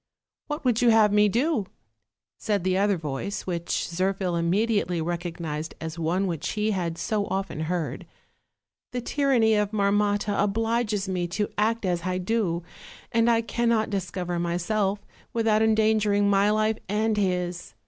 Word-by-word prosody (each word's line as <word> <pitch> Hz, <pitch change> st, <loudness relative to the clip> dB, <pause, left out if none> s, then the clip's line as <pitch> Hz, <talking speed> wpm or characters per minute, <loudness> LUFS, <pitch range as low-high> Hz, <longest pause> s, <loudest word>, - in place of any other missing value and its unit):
"What 295 Hz, -1 st, -5 dB
would 245 Hz, -2 st, +2 dB
you 240 Hz, -, +5 dB
have 220 Hz, -2 st, +5 dB
me 210 Hz, 0 st, +5 dB
do?" 240 Hz, -, 0 dB, 0.7 s
said 205 Hz, -4 st, -1 dB
the 185 Hz, 0 st, +1 dB
other 200 Hz, 0 st, +2 dB
voice, 155 Hz, +5 st, -4 dB
which 170 Hz, -2 st, -2 dB
Zirphil 185 Hz, +1 st, -1 dB
immediately 180 Hz, +1 st, +1 dB
recognized 165 Hz, -2 st, -4 dB
as 160 Hz, +1 st, -6 dB
one 175 Hz, +4 st, 0 dB
which 170 Hz, -5 st, -3 dB
he 215 Hz, 0 st, 0 dB
had 170 Hz, -4 st, -2 dB
so 210 Hz, 0 st, -1 dB
often 190 Hz, -4 st, -3 dB
heard; 170 Hz, -2 st, -3 dB, 0.9 s
"the 250 Hz, -, -2 dB
tyranny 245 Hz, -4 st, +2 dB
of 210 Hz, -1 st, +2 dB
Marmotta 205 Hz, 0 st, +1 dB
obliges 220 Hz, -1 st, 0 dB
me 180 Hz, -2 st, -1 dB
to 205 Hz, +4 st, -2 dB
act 220 Hz, +1 st, +1 dB
as 175 Hz, -2 st, 0 dB
I 185 Hz, +1 st, -2 dB
do, 185 Hz, -3 st, -1 dB, 0.5 s
and 230 Hz, +1 st, +3 dB
I 230 Hz, -1 st, +4 dB
cannot 230 Hz, -2 st, 0 dB
discover 180 Hz, -2 st, -3 dB
myself 190 Hz, +4 st, -1 dB, 0.3 s
without 225 Hz, -2 st, +2 dB
endangering 215 Hz, -2 st, +3 dB
my 200 Hz, 0 st, +4 dB
life 215 Hz, +1 st, +1 dB
and 215 Hz, +2 st, +1 dB
his. 180 Hz, -3 st, -2 dB
200 Hz, 150 wpm, -26 LUFS, 180-220 Hz, 0.9 s, you